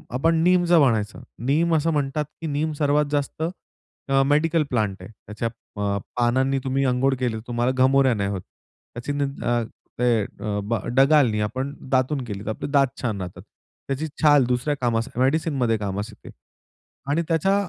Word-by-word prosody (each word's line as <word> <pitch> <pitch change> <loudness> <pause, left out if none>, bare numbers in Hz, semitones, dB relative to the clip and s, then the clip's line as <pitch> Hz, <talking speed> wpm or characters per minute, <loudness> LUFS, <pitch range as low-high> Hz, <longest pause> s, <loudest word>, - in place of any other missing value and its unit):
आपण 165 +6 +2
नीमच 175 0 +3
म्हणायचं, 115 -10 +3 0.2
नीम 165 +4 +3
असं 160 +1 +1
म्हणतात, 150 0 -1 0.2
की 165 - -3
नीम 150 +1 -1
सर्वात 145 +1 +3
जास्त 145 +2 -2 0.7
अ, 135 0 +4
मेडिकल 155 +3 +2
प्लांट 105 -6 0
आहे. 95 - -10
त्याच्या 110 +1 -5 0.3
प 100 -1 -1 0.2
पानांनी 130 +3 +2
तुम्ही 135 +1 0
अंघोळ 130 +2 +2
केली 120 -3 0
तर 110 - -5
तुम्हाला 120 +1 0
घमोऱ्या 135 -1 +4
नाही 100 -2 -1
होत. 95 -3 -3 0.5
त्याची 120 +4 -5
निन 140 -1 -3
अ, 120 -1 +1 0.4
ते 120 -2 +3
अ, 105 +1 -4
ब 115 +3 -1 0.2
डहाळी 135 -5 +4
आपण 130 +6 -3 0.2
दातून 130 +1 +1
केली, 105 -2 -6
तर - - -3
आपले 110 - -4
दात 140 -2 +4
छान 110 -6 -2
राहतात. 90 -1 -7 0.5
त्याची 140 +3 -2
छाल 145 -4 +6
दुसऱ्या 125 +4 0
कामास 115 -1 0
मेडिसिनमध्ये 130 -4 +1
कामास 100 +1 -3
येते. - - -14 0.8
आणि 165 - +2
त्याच्या 175 +4 +2
130 Hz, 165 wpm, -23 LUFS, 115-145 Hz, 0.8 s, छाल